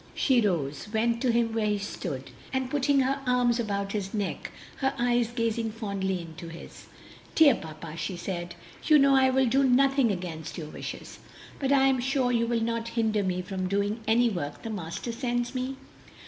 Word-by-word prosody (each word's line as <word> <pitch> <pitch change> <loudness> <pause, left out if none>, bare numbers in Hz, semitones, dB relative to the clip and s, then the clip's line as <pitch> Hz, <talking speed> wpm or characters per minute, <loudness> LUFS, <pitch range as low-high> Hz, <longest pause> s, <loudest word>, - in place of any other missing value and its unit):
She 255 -4 +3
rose, 160 -7 -1
went 230 +1 +1
to 255 -2 +3
him 230 -1 +1
where 220 -1 +1
he 210 -1 +1
stood, 170 -9 -5 0.2
and 260 -1 -2
putting 285 -1 +3
her 270 +1 0
arms 245 -1 +3
about 200 -3 -2
his 200 -1 -3
neck, 205 -2 -3 0.3
her 270 0 0
eyes 240 -1 +2
gazing 230 -2 -1
fondly 195 -4 -2
into 165 0 -9
his, 165 +1 -11 0.5
"Dear 305 -4 +7
papa," 160 -3 -8
she 180 +2 -3
said, 175 -1 -5 0.3
"you 305 - +7
know 275 -1 +5
I 265 0 +5
will 265 0 +3
do 265 +3 +3
nothing 270 -1 +4
against 170 -4 -5
your 155 -3 -6
wishes, - - -7 0.4
but 275 -1 0
I 270 -1 +5
am 265 -1 +3
sure 255 0 +1
you 235 -1 +1
will 230 -1 0
not 230 0 -1
hinder 220 -2 +2
me 180 -1 -1
from 185 0 -3
doing 200 +3 0
any 235 +2 +4
work 170 -9 -4
the 225 - -4
Master 185 +3 -4
sends 240 0 -2
me?" 260 +1 -3
230 Hz, 190 wpm, -28 LUFS, 190-255 Hz, 0.5 s, Dear